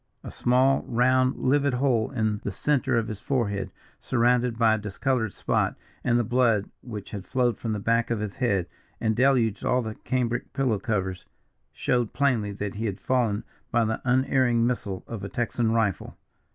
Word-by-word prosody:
A - - -7
small, 130 +2 +3
round, 130 +2 +3
livid 140 0 +2
hole 125 -4 +1
in 110 -5 -1
the 100 - -2
centre 130 +3 +1
of 115 -1 0
his 110 -3 -5
forehead, 110 -7 -1 0.3
surrounded 120 -1 +2
by 115 -1 +4
a - - +1
discoloured 110 +2 -1
spot, - - 0 0.3
and 120 -1 +2
the 120 - +2
blood 115 -3 +2
which 105 -5 -8
had 100 -3 -5
flowed 125 +1 0
from 115 -2 -2
the 105 - -2
back 115 +3 +1
of 115 -2 0
his 105 -2 -5
head 100 -8 +1 0.3
and 110 -1 +1
deluged 125 -4 +2
all 125 0 +2
the 110 -1 -4
cambric 120 0 -2
pillow 125 -7 +1
covers, 95 -4 -2 0.4
showed 120 -3 0
plainly 125 -8 +1
that 100 0 -4
he 110 +2 -3
had 100 -1 -4
fallen 115 -5 0 0.3
by 115 -1 +2
the 110 0 -2
unerring 130 -2 +2
missile 105 -6 -2
of 115 -4 -7
a 100 - -4
Texan 120 0 0
rifle. 110 -5 -1
115 Hz, 180 wpm, -26 LUFS, 105-125 Hz, 0.4 s, by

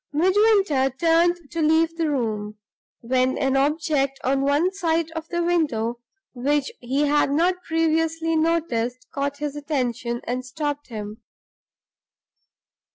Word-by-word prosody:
Midwinter 375 -4 +3
turned 340 -1 +2
to 335 -1 -2
leave 320 +1 +3
the 330 -2 0
room, 215 -6 -2 0.4
when 255 +2 +1
an 270 -1 +1
object 280 -1 +1
on 270 +1 +1
one 290 +7 +2
side 330 -3 0
of 325 -1 -6
the 345 0 -1
window, 245 -10 0 0.3
which 275 +3 0
he 270 +4 0
had 295 -1 +2
not 350 +5 +1
previously 325 0 0
noticed, 255 -7 0
caught 280 0 -2
his 295 -1 -4
attention 250 -5 -2
and 250 +1 -3
stopped 290 +2 -4
him. 215 -1 -7
295 Hz, 125 wpm, -23 LUFS, 260-330 Hz, 0.4 s, Midwinter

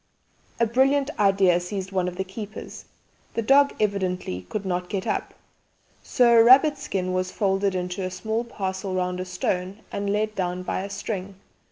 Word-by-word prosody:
A 230 - +4
brilliant 270 +5 +2
idea 195 -3 +4
seized 190 +1 -5
one 185 -2 0
of 180 - -4
the 190 - -2
keepers. 205 +3 -8 0.5
The 230 - 0
dog 280 +4 +5
evidently 185 - -1
could 205 -2 -4
not 180 -1 -2
get 195 -2 -3
up, - - -2 0.7
so 245 -1 +3
a - - +8
rabbit 275 +4 +6
skin 185 -9 -2
was 185 0 -1
folded 195 -1 0
into 180 +1 -3
a 185 - -2
small 220 +5 -2
parcel 190 -4 -4
round 180 0 -1
a 185 - -3
stone 180 +2 -3
and 200 0 -2
let 215 +1 0
down 180 -1 -2
by 185 - -2
a 200 - -5
string. 200 -1 -5
195 Hz, 175 wpm, -25 LUFS, 185-215 Hz, 0.7 s, a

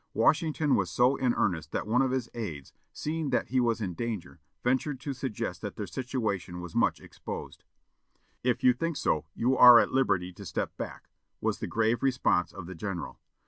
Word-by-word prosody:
Washington 155 - +2
was 90 -3 0
so 125 +10 +3
in 125 -3 +1
earnest 80 -5 0
that - - -1
one 115 +4 +2
of 135 - +2
his 130 -2 -1
aids, 80 - -6 0.2
seeing 155 -1 -3
that 125 - 0
he 130 - +2
was 115 -2 +1
in 95 -4 -2
danger, 105 -5 -5 0.2
ventured 130 +2 0
to 140 +1 -3
suggest 130 -4 -4
that - - -5
their - - -4
situation 105 -9 -3
was 90 -2 -8
much - - +2
exposed. - - -8 0.8
"If 125 +1 0
you 125 -1 +6
think 165 +4 -2
so, 80 - 0
you 130 +3 +2
are 125 -2 +10
at 115 - +3
liberty 90 -9 +1
to - - -11
step - - -3
back," - - -7 0.3
was - - -1
the - - -3
grave 115 +1 +1
response 130 -9 +2
of 95 -3 -8
the 95 - -7
general. 90 0 -5
120 Hz, 190 wpm, -29 LUFS, 95-130 Hz, 0.8 s, are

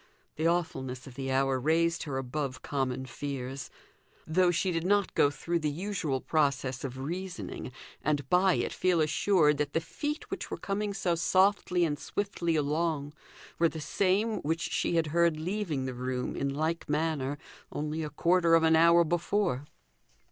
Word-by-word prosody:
The 160 +2 +1
awfulness 135 -7 -1
of 130 - -10
the 135 +1 -4
hour 135 0 +2
raised 165 +4 +2
her 140 -3 -3
above 135 0 -3
common 130 -2 -2
fears; 135 0 -5 0.6
though 180 +3 +3
she 180 +2 +1
did 165 -1 -1
not 200 +1 +2
go 145 - +4
through 170 +4 -2
the 155 -2 0
usual 160 -4 -2
process 140 -4 0
of 130 -2 -5
reasoning, 175 +1 -5 0.3
and 145 -3 0
by 180 +4 +4
it - - -1
feel 180 -2 +2
assured 155 -1 +3
that 150 0 -1
the - - +2
feet 295 - -5
which - - -4
were - - -4
coming 200 0 -2
so 190 -3 0
softly 185 0 +3
and 145 -3 -2
swiftly 175 -4 -2
along 150 0 0 0.5
were 165 -1 +4
the 160 - -7
same 200 +7 +1
which 160 +3 -2
she - - 0
had 165 -1 +3
heard 170 -2 +3
leaving 170 -5 -2
the 130 - -3
room 125 0 -3
in 140 - -1
like 155 +4 -2
manner 150 -2 0 0.3
only 150 +2 -3
a 155 - -3
quarter 170 +3 +3
of 165 - +4
an 160 0 +5
hour 170 +1 +6
before. 175 -3 0
160 Hz, 170 wpm, -29 LUFS, 140-175 Hz, 0.6 s, hour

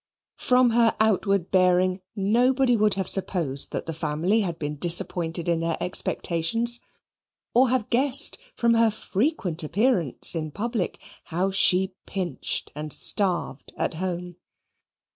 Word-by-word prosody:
From 250 -1 +3
her 230 -1 +2
outward 200 -4 0
bearing 185 0 +2
nobody 245 +5 +2
would 210 -2 +2
have 190 -2 -3
supposed 165 -8 -1
that - - -4
the 165 - -5
family 160 +7 -1
had 175 -5 -3
been 150 -1 -5
disappointed 170 0 0
in 170 -1 +1
their 165 -1 -2
expectations, 195 +7 +1 0.7
or 255 +1 +4
have 250 -4 -2
guessed 275 +4 +3 0.2
from 235 -1 +2
her 230 0 +3
frequent 210 - -2
appearance 180 - +1
in 160 -2 -4
public 220 - -4 0.3
how 180 +4 -2
she 190 0 +2
pinched 185 -3 -4
and 150 +1 -7
starved 175 +1 +2
at - - -2
home. 175 0 -5
190 Hz, 130 wpm, -24 LUFS, 170-230 Hz, 0.7 s, or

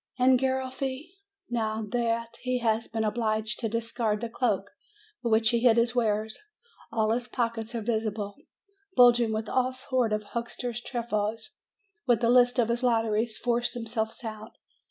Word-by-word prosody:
And 255 0 +5
Garoffi? 265 +3 -2 0.4
Now 220 -2 -1
that 230 -1 -1
he 255 0 0
has 225 -1 0
been 225 -1 -2
obliged 215 0 0
to 225 - -1
discard 230 -1 -1
the 235 - -3
cloak 205 -5 -1 0.5
beneath 235 - -1
which 220 0 +4
he 235 - +2
hid 235 -1 +5
his 235 +1 +3
wares, 220 -2 0 0.5
all 220 -1 +1
his 240 +1 -1
pockets 230 -1 -2
are 230 - -2
visible, 215 -2 -2 0.6
bulging 240 -2 +6
with 220 0 -2
all 255 +2 +1
sorts 255 -4 0
of 215 - -4
huck 235 +3 -4
ster's 240 -2 -4
trifles, 225 -3 -2 0.6
and 240 -3 +4
the 230 -1 +2
lists 245 0 +5
of 235 -2 +2
his 235 +1 0
lotteries 225 -2 +1
force 240 0 0
them 235 -1 -4
selves 225 +2 -3
out. 215 -1 -7
230 Hz, 165 wpm, -28 LUFS, 220-245 Hz, 0.6 s, bulging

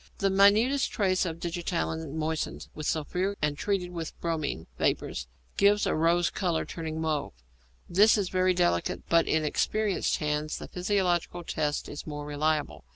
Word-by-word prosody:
The 195 0 +1
minutest 215 +8 +4
trace 185 -3 +1
of 165 0 -5
digitalin 170 -3 -3
moistened 160 0 -3
with 155 -1 -5
sulphuric 180 +6 -1
and 150 -1 0
treated 180 +1 -1
with 165 -2 -6
bromine 155 - -2
vapour - - +1 0.5
gives 205 +1 +4
a - - +1
rose 170 +2 +2
colour, 175 -4 -1
turning 160 -2 -5
to 160 - -3
mauve. 155 - -1 0.5
This 205 +5 +5
is 195 -3 -1
very 185 0 +2
delicate, 85 - +1
but 170 0 +4
in 155 -1 +1
experienced 210 +6 0
hands 150 -1 -2
the - - -7
physiological 180 -2 0
test 150 -3 -2
is 145 - -8
more 150 -1 -5
reliable. 150 +1 -1
170 Hz, 155 wpm, -28 LUFS, 155-190 Hz, 0.5 s, This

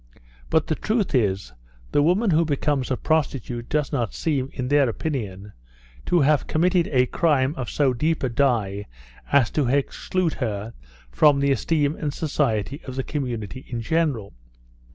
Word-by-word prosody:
But 160 -1 +2
the - - 0
truth 215 +4 -1
is, 95 - 0 0.4
the - - +3
woman 185 +7 +3
who 160 +1 +4
becomes 145 -3 0
a 130 - 0
prostitute 130 -6 -1
does 150 -2 0
not 120 -7 -2
seem, 140 -5 -1
in 125 -2 -4
their 145 -3 +4
opinion, 105 -7 -4 0.5
to 175 - +3
have 145 +1 +3
committed 175 +2 +2
a 125 -3 +3
crime 140 -1 +1
of 130 -6 -5
so 140 -3 +2
deep 155 +6 0
a 130 - +1
dye 115 -6 0 0.4
as 140 -5 +4
to 145 -4 +1
exclude 155 +6 0
her 110 -1 -3 0.4
from 140 - +4
the 140 0 +2
esteem 145 +4 +1
and 145 -2 -3
society 140 -4 -1
of 130 - -6
the 130 - -2
community 125 -5 -4
in 120 -2 -3
general. 145 - 0
140 Hz, 160 wpm, -24 LUFS, 120-155 Hz, 0.5 s, who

